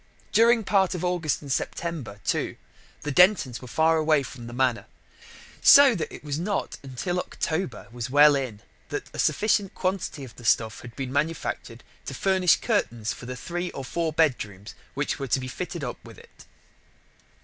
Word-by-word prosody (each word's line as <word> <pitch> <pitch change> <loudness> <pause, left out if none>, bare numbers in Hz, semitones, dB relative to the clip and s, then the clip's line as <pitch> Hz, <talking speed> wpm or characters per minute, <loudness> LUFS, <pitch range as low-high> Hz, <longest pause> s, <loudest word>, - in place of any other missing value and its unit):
During 230 0 +5
part 190 -2 +2
of 180 - -3
August 175 -5 -1
and 140 - -6
September, 145 -8 -3
too, - - -1 0.5
the 150 - -3
Dentons 180 - +4
were 160 +6 +2
away 155 -2 +3
from 120 -2 -9
the - - -8
Manor. 125 -1 0 0.7
So 280 -2 +8
that 170 -8 -3
it - - -10
was 145 0 -3
not 200 +3 -2
until 140 +7 -3
October 160 - -3
was 120 +1 -5
well 145 +2 +7
in 125 -7 -3 0.3
that - - -5
a - - -8
sufficient 205 -2 +1
quantity 185 -6 -2
of 120 -5 -11
the 120 - -12
stuff 110 -1 +2
had 120 -1 -11
been 135 -2 -5
manufactured 145 -5 -2 0.2
to 135 - -5
furnish 190 0 +3
curtains 120 - -1
for 125 - -10
the 125 - -5
three 175 +7 -4
or 135 - -6
four 165 +4 -1
bedrooms 110 - -1 0.2
which 145 +1 -2
were 135 - -3
to 130 - +1
be 130 - -5
fitted 175 +3 -5
up 125 - -6
with - - -13
it. - - -17
150 Hz, 175 wpm, -26 LUFS, 125-180 Hz, 0.7 s, So